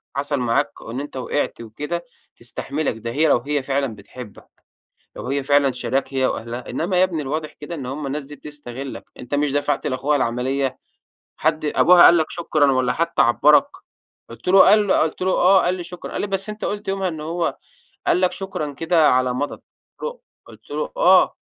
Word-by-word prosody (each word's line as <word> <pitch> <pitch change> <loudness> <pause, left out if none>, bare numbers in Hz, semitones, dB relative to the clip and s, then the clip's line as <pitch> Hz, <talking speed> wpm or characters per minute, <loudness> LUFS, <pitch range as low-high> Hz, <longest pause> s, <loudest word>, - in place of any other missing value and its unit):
حصل 140 0 -1
معاك 120 -2 +1
إن - - -10
إن 120 +3 -4
أنت 145 -1 -7
وقعت 130 0 -2
وكده 150 +10 -5 0.3
تستحملك، 135 +2 -3
ده 115 +1 -5
هي 155 +6 +2
لو 145 - +5
هي 145 +3 -2
فعلًا 135 -3 -1
بتحبك. 105 +2 -12 0.7
لو - - -7
هي 140 +1 -1
فعلًا 140 -1 +3
شاريَّاك 125 +2 -2
هي 130 -1 +2
وأهلها، 120 +1 -4
إنّما 180 +3 -1
يا 185 - +6
ابني 170 -5 -2
الواضح 155 +3 -4
كده 150 +3 -8
إن 140 -6 -6
همّ 140 +3 -5
الناس 145 +1 -3
دي 145 +2 -11
بتستغلك، 140 -2 -8
أنت 125 +3 -6
مش 145 -1 +1
دفعت 145 0 0
لأخوها 140 +3 0
العمليّة 130 +2 -1 0.6
حد 155 0 0
أبوها 175 +4 +6
قال 170 - +8
لك 160 - +1
شكرًا 155 -4 +1
والّا 130 -1 +1
حتّى 170 +4 +1
عبرك؟" 145 +5 +5 0.6
قلت 115 +7 -9
له 190 +1 +6
قال 210 +1 +6
له 190 - +3
قلت 160 +3 -1
له: 185 0 +1
"آه، 190 +2 +5
قال 180 - +1
لي 180 -1 -6
شكرًا" 175 0 -9
قال - - -3
لي: - - -1
"بس 195 0 -3
أنت 210 0 -7
قلت 205 -1 -4
يومها 195 -1 0
إن 160 -3 -6
هو 165 +2 -2 0.5
قال 180 - +3
لك 185 -1 +2
شكرًا 185 -7 -5
كده 165 +2 +3
على 130 0 +2
مضض." 145 +3 -2
قلت - - -36
له 485 +1 -5 0.3
قلت - - -17
له: - - -3
"آه." - - +5
145 Hz, 200 wpm, -21 LUFS, 130-170 Hz, 0.7 s, قال